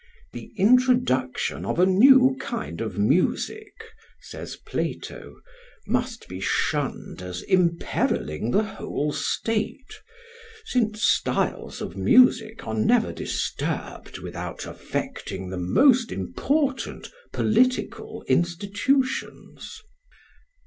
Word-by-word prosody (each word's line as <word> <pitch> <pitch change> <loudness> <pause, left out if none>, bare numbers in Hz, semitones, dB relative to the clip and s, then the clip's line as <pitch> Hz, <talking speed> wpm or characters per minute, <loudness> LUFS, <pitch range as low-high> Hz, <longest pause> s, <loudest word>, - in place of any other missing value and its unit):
"The - - -9
introduction 230 - +2
of - - -2
a 180 - +5
new 260 +7 +6
kind 225 - -5
of 110 -4 -4
music," 185 - 0 0.4
says - - -8
Plato, - - -5 0.5
"must 245 -1 -2
be 90 - -7
shunned 95 - -2
as 90 0 -6
imperilling 170 - 0
the 205 - +3
whole 150 -8 -3
state; 225 - -2 0.7
since 220 - 0
styles - - 0
of - - -6
music 225 -3 +4
are 110 - -4
never 110 -1 +2
disturbed - - -4
without - - -6
affecting 95 -1 -5
the 95 - -4
most 240 - +4
important 270 - -2 0.2
political 250 +4 0
institutions." 205 - -1
215 Hz, 95 wpm, -24 LUFS, -, 0.7 s, new